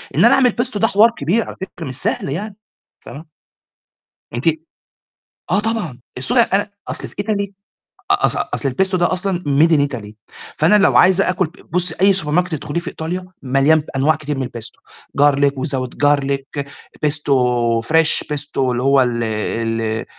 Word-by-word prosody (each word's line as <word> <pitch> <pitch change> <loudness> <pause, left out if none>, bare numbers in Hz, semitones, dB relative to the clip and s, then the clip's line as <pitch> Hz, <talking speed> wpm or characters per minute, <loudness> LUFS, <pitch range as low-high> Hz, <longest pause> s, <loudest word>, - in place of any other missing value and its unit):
إن - - +5
أنا - - +6
أعمل 250 -4 +3
pesto 245 -3 -3
ده 225 - +3
حوار 220 +3 +5
كبير 180 +11 +1
على - - -8
فكرة 185 -3 -7
مش 130 -2 -5
سهل - - -1
يعني 195 +8 -4 0.4
فاهمة؟ 150 +4 -11 1.1
أنتِ 120 +2 -4 1.1
آه، 190 +4 +3
طبعًا، 210 - -3 0.2
الصو 135 - -2
ده 250 - +6
أنا 205 -1 0 0.2
أصل - - -5
في - - -19
Italy 200 -1 -2 0.6
أ - - +3
أص - - -1 0.2
أصل 140 - -1
الpesto 190 +7 +1
ده 175 - +2
أصلًا 185 0 -1
made 150 0 +2
in 150 -3 +4
Italy، 115 -7 -7 0.5
فأنا 165 +7 +4
لو 205 - +4
عايزة 190 +1 +4
آكُل 185 0 +1
ب 160 - -20
بُصّي 180 -1 -1
أي 195 +1 +6
سوبر 160 -6 -1
ماركت 180 +2 +1
تدخّليه 145 +2 -4
في 170 - -11
إيطاليا 180 +3 -4 0.2
مليان 135 +4 +3
ب 150 - -8
أنواع 145 +4 +3
كتير 150 -1 -5
من 130 -2 -2
الpesto، 120 -2 -10 0.4
garlic 145 -1 +4
without 130 -3 -3
garlic، 140 0 0 0.4
pesto 145 -1 -1 0.6
fresh، 160 0 +4
pesto 150 -1 -5
اللي 125 -2 0
هو 135 0 +4
ال 120 -2 0
ال 115 0 -2
155 Hz, 175 wpm, -18 LUFS, 135-190 Hz, 1.1 s, أنا